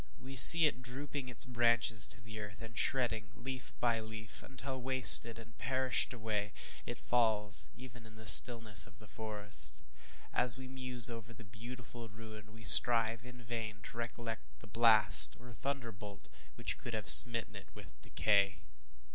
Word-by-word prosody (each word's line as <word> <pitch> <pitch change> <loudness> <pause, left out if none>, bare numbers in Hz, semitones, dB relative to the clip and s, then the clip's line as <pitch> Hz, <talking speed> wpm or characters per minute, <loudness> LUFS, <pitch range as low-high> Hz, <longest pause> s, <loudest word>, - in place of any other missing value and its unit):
We 135 +1 -16
see 165 +6 +10
it 135 -4 -7
drooping 130 +1 -13
its 125 - -4
branches 115 -3 -4
to - - -10
the 110 0 -16
earth, 105 -2 -14
and 115 0 -17
shedding 110 -3 -6
leaf 130 0 -12
by 120 -2 -6
leaf, 110 0 -14
until, 130 0 -12
wasted 125 -3 +5
and 115 0 -20
perished 130 +1 -4
away, 110 -3 -10 0.3
it - - -12
falls 110 -4 -3
even 120 -2 -18
in 110 - -23
the 110 0 -19
stillness 115 -5 +5
of 100 - -24
the 110 - -19
forest; 105 - -10 0.5
and - - -5
as 125 0 -4
we 130 0 -16
muse 130 -3 -7
over 115 0 -16
the 115 - -19
beautiful 115 +1 -16
ruin, 110 -1 -18
we 115 +1 -20
strive 115 0 +1
in 125 0 -19
vain 110 -2 -12
to 115 - -16
recollect 115 -1 -13
the - - -13
blast 105 -9 -2
or 125 +1 -19
thunderbolt 110 - -13 0.3
that - - -6
could 120 - -12
have 110 - -11
smitten 115 -2 +6
it - - -17
with - - -19
decay. 100 -2 -5
115 Hz, 165 wpm, -28 LUFS, 110-125 Hz, 0.5 s, see